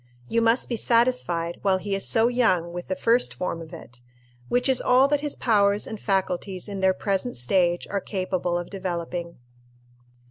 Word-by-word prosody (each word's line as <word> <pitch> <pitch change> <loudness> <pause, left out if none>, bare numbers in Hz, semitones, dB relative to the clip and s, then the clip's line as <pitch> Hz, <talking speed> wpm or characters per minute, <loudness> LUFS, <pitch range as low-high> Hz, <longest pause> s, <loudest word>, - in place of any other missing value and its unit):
You 230 - +1
must 230 +2 +2
be 235 - -2
satisfied, 230 -9 +1
while 195 -1 +2
he 195 +2 -4
is 195 - 0
so 225 0 +3
young, 185 -9 +1
with 175 0 -6
the 185 - -2
first 230 +6 +2
form 175 -2 -3
of 160 -1 -10
it, 120 +1 -12 0.5
which 245 +2 +1
is 265 -2 +2
all 255 +2 +4
that 290 -1 +1
his 295 -1 -2
powers 205 -3 +2
and 220 - -7
faculties 190 -1 -2
in 200 -1 -5
their 190 0 +3
present 200 +5 -2
stage 175 +8 +1
are 200 -1 -2
capable 185 -3 -2
of 175 - -6
developing. 175 -3 -4
195 Hz, 180 wpm, -25 LUFS, 175-230 Hz, 0.5 s, all